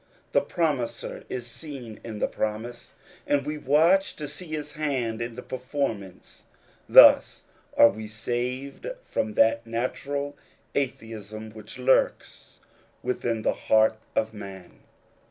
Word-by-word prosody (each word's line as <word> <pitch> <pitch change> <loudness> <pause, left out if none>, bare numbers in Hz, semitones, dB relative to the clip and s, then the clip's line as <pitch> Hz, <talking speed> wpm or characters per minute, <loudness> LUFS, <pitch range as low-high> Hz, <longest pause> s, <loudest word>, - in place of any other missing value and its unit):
The - - +4
Promiser 150 -9 -2
is 125 -2 -4
seen 120 -3 -8
in 110 -2 -6
the - - +1
promise, 110 +3 -4 0.3
and 140 -1 +2
we 150 0 -3
watch 165 +8 +4
to 150 - -5
see 160 +5 -8
his 150 -1 -4
hand 130 -8 -2
in 120 -1 -4
the - - -7
performance; 125 -8 -4 0.5
thus - - +8 0.3
are 115 - +9
we 110 0 -7
saved 125 - -3 0.2
from 110 - -2
that 115 +1 +3
natural 140 +5 -2 0.4
atheism 110 -5 -4
which 110 +1 -11
lurks 130 +1 +1 0.4
within 120 -3 -1
the - - +2
heart 110 0 +3 0.2
of 110 0 0
man. 95 -4 -10
120 Hz, 125 wpm, -26 LUFS, 110-140 Hz, 0.5 s, are